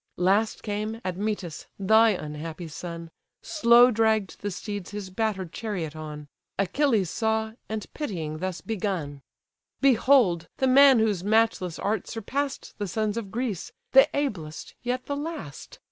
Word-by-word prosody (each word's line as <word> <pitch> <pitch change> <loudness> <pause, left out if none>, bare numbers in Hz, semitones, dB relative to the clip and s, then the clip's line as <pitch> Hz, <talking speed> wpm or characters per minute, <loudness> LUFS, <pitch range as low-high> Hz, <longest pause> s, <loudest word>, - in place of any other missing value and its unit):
Last 195 +5 +2
came, 215 +1 -3
Admetus! 185 -2 -3
thy 220 +3 +5
unhappy 160 -2 -4
son; 170 +1 -7 0.3
Slow 245 -4 +6
dragged 220 -3 +1
the 205 - -2
steeds 205 0 -5
his 205 -2 -6
batter'd 195 -4 -2
chariot 180 -9 -4
on: 150 -1 -7 0.3
Achilles 205 - +1
saw, 220 0 0 0.2
and 220 -1 -3
pitying 165 - -4
thus 185 -2 -3
begun: 180 -10 -3 0.6
"Behold! 245 -10 +4
the 265 - +1
man 270 0 +7
whose 210 -5 +1
matchless 205 -5 +2
art 210 -1 -1
surpass'd 270 +5 -3
The 205 - -2
sons 215 +3 -1
of 230 -4 -4
Greece! 225 -4 -3 0.2
the 270 0 +7
ablest, 175 - -3
yet 250 +1 -2
the 285 - -2
last! 290 - -7
210 Hz, 135 wpm, -26 LUFS, 175-230 Hz, 0.6 s, man